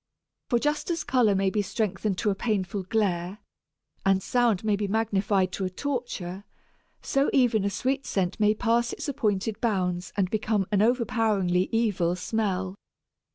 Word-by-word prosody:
For 240 - +3
just 295 +6 -1
as 335 -3 -1
colour 240 -6 +3
may 195 0 +1
be 210 - +1
strengthened 200 -1 -2
to 210 0 +1
a - - +1
painful 195 -2 -1
glare, 185 -2 -1 0.7
and 195 -1 +2
sound 240 -6 +2
may 215 -1 +2
be 205 0 -2
magnified 200 -3 +1
to 195 - -4
a - - -1
torture, 200 -5 -4 0.6
so 275 +1 +1
even 240 -6 +3
a 200 - +1
sweet 265 +7 -2
scent 185 0 -1
may 210 0 +4
pass 235 +2 +1
its - - -5
appointed 215 -5 -1
bounds 180 -5 -1
and 195 -2 +2
become 215 -2 0
an 205 -1 +3
overpoweringly 220 -6 +1
evil 205 -7 +1
smell. 190 -1 -2
210 Hz, 155 wpm, -26 LUFS, 190-230 Hz, 0.7 s, may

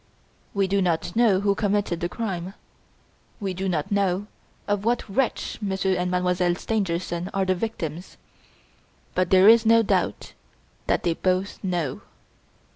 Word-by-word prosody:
We 200 -1 +2
do 200 +1 +1
not 175 -1 -1
know 220 -5 +4
who 200 0 +2
committed 205 -4 0
the 175 - -2
crime; 190 -3 -4 0.8
we 195 -4 -3
do 190 +1 -2
not 160 -1 -2
know 200 -1 +1 0.4
of 205 -1 0
what 235 +2 0
wretch 245 +5 -1
Monsieur 190 -1 0
and 180 0 -1
Mademoiselle 180 -1 +1
Stangerson 180 -4 -2
are 195 -1 +1
the 185 - +2
victims, 175 -4 -5 1.0
but 185 -1 +1
there 190 +1 +6
is 225 0 +8
no 230 0 +5
doubt - - -1 0.5
that - - +1
they 170 - +1
both 185 +4 -1
know! 175 -7 -2
190 Hz, 145 wpm, -24 LUFS, 180-205 Hz, 1.0 s, is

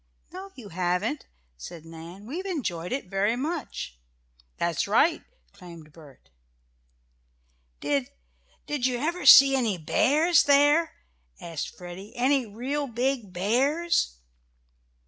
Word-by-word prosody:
"No 380 +3 -9
you 225 -6 -11
haven't," 180 - -2 0.3
said 165 - -10
Nan. 165 +4 -11
"We 300 +11 -5
enjoyed 210 - -4
it 270 +2 -2
very 195 +4 0
much." 270 - -5 0.6
"That's 170 0 -1
right!" 295 +11 +2 0.2
exclaimed 170 -4 -14
Bert. 140 - -17 1.5
"Did 140 -3 -1 0.6
did 285 -4 -1
you 250 -1 -1
ever 335 +7 -2
see 270 0 +9
any 230 -7 0
bears 300 - +3
there?" 290 +3 +4 0.4
asked 165 -3 -6
Freddie, 180 +3 -10
"any 255 0 +1
real 265 +7 -3
big 240 -3 -2
bears?" 250 - 0
230 Hz, 110 wpm, -26 LUFS, 175-285 Hz, 1.5 s, see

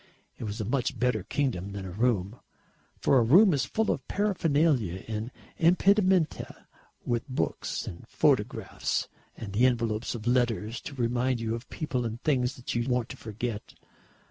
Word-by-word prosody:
It - - -4
was 105 0 -4
a 110 - -2
much 125 +3 -1
better 125 0 +1
kingdom 100 -10 -2
than 100 -1 -5
a 95 - -6
room; 110 0 0 0.6
for 135 - +4
a - - +4
room 180 - +6
is 135 -3 +1
full 220 +8 0
of - - -4
paraphernalia 155 - +1
and 110 +1 -3 0.3
impedimenta, 185 0 +2 0.4
with 120 +2 -1
books 130 - -2
and 85 - -9
photographs, - - 0 0.3
and 100 -3 -7
the 120 +5 +5
envelopes 115 -2 -1
of 110 -2 -7
letters 120 -2 +1
to 140 - -11
remind 125 0 0
you 115 -1 -2
of 115 +2 -6
people 130 -5 -2
and 115 0 -4
things 130 -4 +1
that 125 - -5
you 120 +2 -1
want 125 -2 0
to - - -8
forget. 110 0 -5
120 Hz, 165 wpm, -28 LUFS, 110-140 Hz, 0.6 s, room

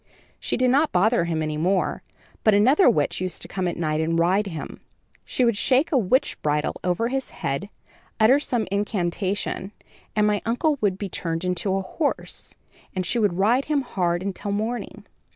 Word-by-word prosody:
She - - -2
did 255 0 +3
not 290 +4 +3
bother 195 +1 +3
him 160 -2 -1
any 155 -1 -2
more; 180 +4 0 0.4
but 215 -2 +5
another 260 - +5
witch 150 +3 0
used 185 -3 -3
to - - -8
come 185 -2 -2
at 175 - -3
night 155 -2 0
and 165 +1 0
ride 185 +5 +2
him. 165 -5 -7 0.4
She 255 - +1
would 235 -2 +2
shake 260 +8 +2
a 285 - +3
witch 250 +6 +1
bridle 150 0 0
over 180 +6 0
his 270 +1 -2
head, 140 +9 -4 0.5
utter 235 +6 +6
some 245 -6 -1
incantation 200 0 -2 0.4
and 210 -1 +3
my 210 -1 +1
uncle 280 +6 0
would 195 -3 +1
be 200 - -4
turned 165 -1 -3
into 180 +2 0
a 195 - -1
horse, 285 - -3 0.4
and 185 -1 -1
she 240 - +1
would 200 -5 +1
ride 235 +8 +3
him 295 -2 +1
hard 180 -7 -1
until 200 +1 -4
morning. 220 +4 -3
200 Hz, 185 wpm, -24 LUFS, 175-235 Hz, 0.5 s, utter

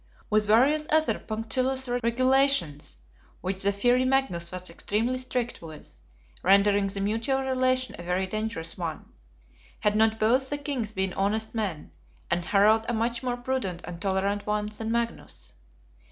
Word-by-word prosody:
With 210 0 +3
various 280 +8 +4
other 315 0 +3
punctilious 255 +4 -1
regulations; 245 - +2 0.4
which 190 +1 -3
the 200 - +3
fiery 245 +5 +2
Magnus 255 -11 0
was 185 0 -4
extremely 225 +9 -1
strict 250 -2 -2
with; 155 -2 -10 0.4
rendering 200 +1 +4
the 195 0 -3
mutual 225 +7 0
relation 255 -1 +1
a - - -5
very 180 +2 0
dangerous 190 -5 -4
one, 165 -3 -5 0.7
had 210 -1 +2
not 220 0 +3
both 255 +5 +2
the 290 - -1
Kings 275 -7 -3
been 190 -3 -2
honest 215 +3 -1
men, 200 -9 -3 0.4
and 170 0 0
Harald 215 +4 +4
a - - 0
much 235 +1 -1
more 250 -1 -2
prudent 245 -8 -3
and 170 -1 -8
tolerant 200 +1 0
one 210 0 0
than 225 +1 -3
Magnus. 235 0 -3
220 Hz, 150 wpm, -27 LUFS, 195-255 Hz, 0.7 s, various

